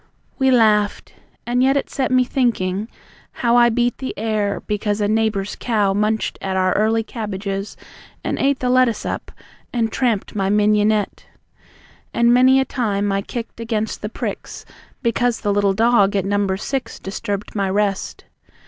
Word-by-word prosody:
We 265 0 +3
laughed. 215 -4 +2 0.3
And 245 +1 +1
yet 270 +2 +3
it 275 - -1
set 265 -2 -1
me 255 0 +4
thinking, 220 -6 0 0.5
how 235 -1 +1
I 240 0 +6
beat 240 +1 0
the 260 - -4
air, 210 -2 -1
because 210 0 -2
a 205 - +1
neighbour's 215 -2 0
cow 210 -5 +1
Munched 215 +2 -1
at 190 -1 -2
our 185 -1 +2
early 220 +2 +2
cabbages, 200 -3 -5 0.5
and - - -2
ate 275 0 +2
The 250 - 0
lettuce 255 -3 +2
up, - - -4 0.4
and 230 -2 0
tramped 235 -6 -1
my 195 -2 0
mignon 210 +1 +3
ette! 210 -2 -2 0.9
And 235 0 +4
many 260 +2 +5
a 265 - +1
time 205 -6 -1
I 195 0 0
kicked 230 +2 -7
against 220 -2 -2
the 210 - -4
pricks - - -6 0.4
Because 240 0 +1
the 205 - 0
little 200 -1 +2
dog 220 -2 +3
at 195 -2 0
number 200 -1 0
six 265 +6 -4
Disturbed 200 +1 -5
my 200 -2 0
rest. 200 0 -1
215 Hz, 165 wpm, -20 LUFS, 200-240 Hz, 0.9 s, I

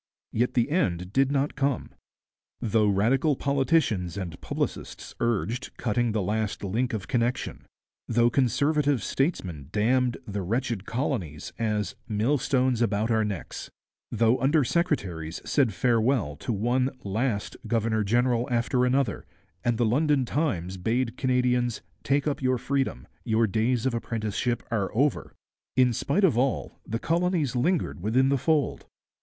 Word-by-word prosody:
Yet 125 +3 0
the 120 +3 +2
end 90 - 0
did 135 0 +3
not 140 +1 +1
come. 140 -3 -1 0.7
Though 110 -1 +2
Radical 125 +9 +2
politicians 135 - +1
and 85 -6 -6
publicists - - -4
urged 120 +2 -1
'cutting 120 0 0
the 105 -2 0
last 105 +2 -2
link 115 +6 -1
of 110 -1 -4
connection'; 120 0 -1 0.4
though 120 +1 +3
Conservative 140 0 +2
statesmen 90 - -2
damned 120 +4 +2
'the 100 -1 -3
wretched 115 +1 -2
colonies' 100 - -3
as 105 -2 -1
'millstones 125 +2 +1
about 110 0 +1
our 110 -1 +3
necks'; 100 -4 -5 0.4
though 115 +2 +3
under 145 +3 +4
secretaries 100 - -1
said 135 -6 +2
farewell 115 - +1
to - - -4
one 120 +5 +1
'last' 105 +2 -1
governor 110 -1 +1
general 120 +3 +2
after 125 +1 +1
another 130 +1 0 0.4
and 120 -2 +1
the 120 - +2
London 140 +3 +2
Times 100 - -1
bade 115 +5 0
Canadians 125 -3 +1 0.2
'take 140 +1 +1
up 150 -2 -1
your 130 -1 +2
freedom, 135 - -2 0.2
your 110 +1 +2
days 115 +4 0
of 130 - +1
apprenticeship 115 +1 -2
are 100 -4 0
over'; 140 +5 0 0.4
in 125 -1 +4
spite 145 - 0
of 145 -11 +4
all, 130 -1 -1
the 115 - -1
colonies 165 -2 0
lingered 155 - 0
within 125 +7 +2
the 140 - +3
fold. 155 +1 0
120 Hz, 140 wpm, -27 LUFS, 110-135 Hz, 0.7 s, under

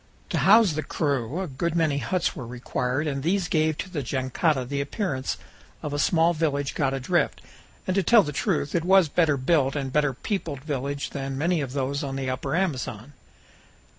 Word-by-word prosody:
To - - +1
house 210 -2 +6
the 155 - -1
crew 140 +1 -1
a 190 - -3
good 160 +4 -2
many 155 -4 +2
huts 170 +8 -1
were 130 -7 -6
required, 125 +3 -2
and 140 -2 -2
these 180 +4 +1
gave 155 -1 +1
to - - -4
the 155 -5 -2
jangada 130 +2 0
the 140 +2 -2
appearance 140 -3 -2 0.5
of 150 - -3
a 145 - -1
small 165 +2 +3
village 145 -3 -1
got 135 -1 0
adrift, 130 -1 0 0.5
and, 185 - 0
to 195 - +3
tell 220 +4 +6
the 150 - -4
truth, 150 -2 -1
it 170 - +1
was 190 0 +6
a 150 - -10
better 160 -5 +3
built 135 0 +2
and 135 -2 -3
better 145 -3 +2
peopled 160 - -3
village 140 -1 -3
than 135 -1 -4
many 165 +2 +1
of 135 -2 -4
those 140 +1 -1
on 135 -1 -3
the 135 -1 -2
Upper 135 +3 -2
Amazon. 140 - -2
145 Hz, 195 wpm, -25 LUFS, 135-170 Hz, 0.5 s, house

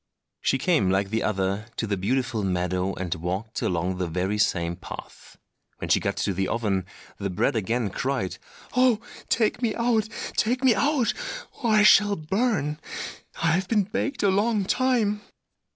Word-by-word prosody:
She 135 - +2
came, 150 - +2
like 95 +1 +1
the 110 - 0
other, 100 +1 -1
to - - 0
the 105 -2 0
beautiful 120 +4 0
meadow 90 0 0
and 90 -3 -2
walked 95 +6 -4
along 90 +1 -1
the 90 - 0
very 90 +5 -1
same 85 -5 +1
path. 95 - -10 0.4
When - - -4
she - - +5
got - - -2
to 100 - 0
the 95 +1 -1
oven 100 -5 -1 0.3
the 100 - -2
bread 105 +7 +1
again 110 0 0
cried, 130 -6 -2 0.4
"Oh, 250 -3 +4 0.3
take 225 +1 +1
me 225 -4 0
out! 230 -2 +1 0.3
take 250 +4 +1
me 255 -3 +6
out! 275 +2 +2 0.5
or 235 - +1
I 215 -1 +5
shall 205 -1 +6
burn; 160 - 0 0.6
I 165 - +4
have 180 +3 +1
been 210 -1 +3
baked 220 +8 -2
a 200 - +5
long 205 +1 +2
time!" 225 -3 +1
125 Hz, 170 wpm, -25 LUFS, -, 0.6 s, me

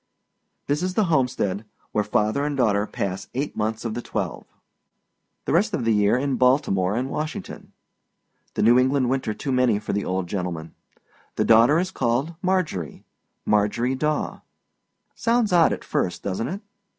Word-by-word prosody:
This 145 +3 0
is 185 0 -2
the 215 - +3
homestead, 110 -8 0 0.3
where 105 - +1
father 105 +6 +1
and 145 -1 -2
daughter 105 -4 +2
pass 95 0 -4
eight 140 +3 -2
months 110 +2 -2
of 115 - -2
the 120 - -4
twelve; - - -4 1.0
the - - -1
rest 200 +5 +2
of 120 - -3
the 115 - +3
year 105 +2 +3
in 135 -1 -1
Baltimore 120 -8 +2
and 125 +3 -1
Washington. 150 +3 -5 0.8
The - - +1
New 120 +3 +6
England 130 -1 +2
winter 130 -5 -1
too 140 - -4
many 125 -4 +3
for 105 - -4
the 100 0 0
old 95 0 -1
gentleman. 85 -3 -4 0.6
The - - +1
daughter 115 +7 +6
is 185 +2 0
called 130 +3 0
Marjorie 180 - -1 0.4
Marjorie 105 +5 +1
Daw. 150 +3 -1 0.7
Sounds 230 -4 +1
odd 170 -2 +5
at - - -4
first, 90 - -2
doesnât 115 - -2
it? 200 - -10
125 Hz, 160 wpm, -24 LUFS, 105-150 Hz, 1.0 s, New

